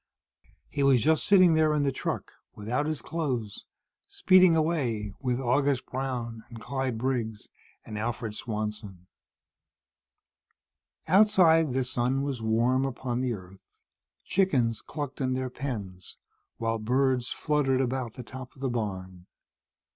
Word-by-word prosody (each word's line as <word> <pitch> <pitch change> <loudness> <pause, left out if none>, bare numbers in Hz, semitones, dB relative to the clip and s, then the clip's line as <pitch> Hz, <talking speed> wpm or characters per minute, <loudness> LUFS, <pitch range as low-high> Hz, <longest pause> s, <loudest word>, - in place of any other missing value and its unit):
He 145 - -3
was 135 -2 +5
just 155 +6 +2
sitting 185 -4 +6
there, 155 -1 +3
in 145 - +1
the 140 - +1
truck, - - -4 0.2
without 125 +8 -2
his 155 -2 -3
clothes, 130 -11 -3 0.4
speeding 185 -2 +5
away 130 - 0
with 125 -2 -1
August 135 +1 +1
Brown 125 -4 -4
and 115 -1 -9
Clyde 130 +1 -3
Briggs 115 -3 -2 0.4
and 105 -1 -6
Alfred 115 -1 -3
Swanson. 105 -4 -5 2.0
Outside, 170 -6 +5
the 130 0 +1
sun 130 +2 0
was 135 -4 -3
warm 120 +4 +2
upon 125 -2 -2
the 125 -2 0
earth. 95 -2 -11 0.6
Chickens 130 - +1
clucked 145 -2 -6
in 130 -1 0
their 130 0 -2
pens, 100 - -6 0.4
while 115 0 -1
birds 125 +2 +1
fluttered 145 -4 +1
about 130 -3 -2
the 125 - -7
top 130 +1 -10
of - - -18
the 135 - 0
barn. 95 -6 -4
130 Hz, 130 wpm, -28 LUFS, 115-140 Hz, 2.0 s, sitting